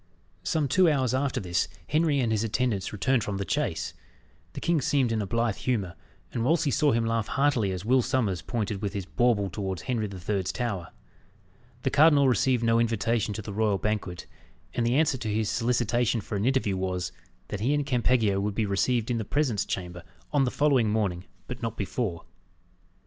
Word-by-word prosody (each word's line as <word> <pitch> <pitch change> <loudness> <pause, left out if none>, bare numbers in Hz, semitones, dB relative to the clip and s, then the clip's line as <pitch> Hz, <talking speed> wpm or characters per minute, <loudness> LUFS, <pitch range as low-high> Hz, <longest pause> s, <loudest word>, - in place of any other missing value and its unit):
Some 155 -4 0
two 180 +6 +4
hours 130 -5 +1
after 135 0 0
this, 90 -2 0 0.2
Henry 155 -2 +2
and 120 -4 +1
his 110 0 +1
attendants 115 -3 -1
returned 115 +3 +1
from 100 -1 -3
the 100 - -3
chase. - - -1 0.6
The - - -5
king 170 -3 +1
seemed 130 -2 +1
in 110 -1 0
a 100 - -3
blithe 115 +1 0
humour, 105 -9 -1 0.4
and 115 - -1
Wolsey 150 +2 +2
saw 150 +1 +3
him 115 -1 +1
laugh 115 -1 0
heartily 135 -8 +1
as 95 +1 -5
Will 130 +3 +4
Sommers 110 -8 0
pointed 105 -4 -3
with 100 -2 -2
his 100 -3 -4
bauble 115 -2 +2
towards 95 -1 -4
Henry 115 -4 -1
the 95 -2 -8
Third's 95 +1 -1
Tower. 105 -9 -3 1.0
The - - +1
cardinal 145 -2 +6
received 125 -1 +2
no 115 0 +3
invitation 115 -1 +1
to 110 - -5
the 100 - -6
royal 105 -1 +1
banquet; 100 -3 -3 0.5
and 120 -1 0
the 120 - +2
answer 145 -3 +2
to 110 -2 -3
his 110 0 0
solicitation 120 -1 +1
for 105 - -5
an 100 +2 0
interview 125 -7 +1
was, 90 -1 -2 0.4
that 100 - -4
he 120 +7 +1
and 145 -1 0
Campeggio 120 -6 +2
would 100 0 -2
be 110 - +1
received 115 +4 0
in 115 - 0
the - - -2
presence 125 -2 0
chamber 90 -2 -4 0.3
on 140 -2 +4
the - - +1
following 135 -6 +2
morning, 100 -4 -1 0.2
but 125 0 -7
not 115 -1 -3
before. 100 -4 -3
115 Hz, 195 wpm, -27 LUFS, 100-130 Hz, 1.0 s, cardinal